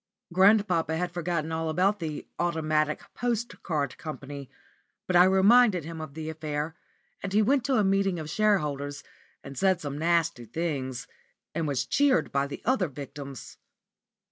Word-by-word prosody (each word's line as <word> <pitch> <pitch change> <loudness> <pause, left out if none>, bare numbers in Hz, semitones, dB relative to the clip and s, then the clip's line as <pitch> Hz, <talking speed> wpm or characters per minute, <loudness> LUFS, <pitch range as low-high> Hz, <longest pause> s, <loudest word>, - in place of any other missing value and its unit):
Grandpapa 185 -4 +4
had 180 +1 -2
forgotten 170 -2 -2
all 160 0 -1
about 190 +6 +2
the 155 -3 -4
"Automatic 155 -3 0
Postcard 220 - -2
Company," 140 -3 -7 0.6
but 185 - -1
I 175 +1 +8
reminded 190 0 +5
him 165 0 -6
of 155 -2 -8
the 160 -1 -5
affair, 155 0 -4 0.5
and 195 -1 -4
he 215 +1 +4
went 270 +3 +2
to 270 -1 +2
a 215 - +3
meeting 195 -1 +2
of 155 -2 -5
shareholders 150 -7 0 0.4
and 140 - -9
said 190 0 +2
some 145 -3 -5
nasty 165 -6 +1
things, 130 -2 -3 0.5
and 160 -1 -1
was 140 -3 0
cheered 280 -3 +2
by 140 0 +1
the 140 - -8
other 245 -7 +2
victims. 140 -1 -9
165 Hz, 150 wpm, -27 LUFS, 150-195 Hz, 0.6 s, I